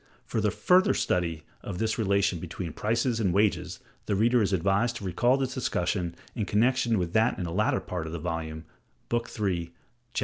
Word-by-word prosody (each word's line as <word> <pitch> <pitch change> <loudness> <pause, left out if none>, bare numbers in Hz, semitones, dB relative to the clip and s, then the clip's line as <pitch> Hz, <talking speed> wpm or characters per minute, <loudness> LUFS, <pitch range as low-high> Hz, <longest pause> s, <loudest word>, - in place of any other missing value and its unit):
(For - - -2
a - - +2
further 185 0 +3
study 85 -4 0 0.2
of 90 - -6
this 110 +2 -1
relation 100 -4 +2
between 85 -1 -6
prices 115 +4 0
and 100 -5 +2
wages 105 +2 +1 0.3
the 100 - +1
reader 115 +4 +3
is 100 - +1
advised 100 +6 +1
to 110 - -7
recall 120 +8 +2
this 130 -2 -2
discussion 90 -8 -1 0.2
in 110 -4 -2
connection 120 +2 +2
with 90 -2 -2
that 110 +2 +3
in 90 - -3
a 85 - -4
later 105 +4 +2
part 85 -3 -5
of - - -6
the 85 - -3
volume, 80 -1 -4 0.4
Book 120 0 -1
III, 85 -5 -1 0.4
Chaps. - - +2
100 Hz, 195 wpm, -28 LUFS, 85-115 Hz, 0.4 s, further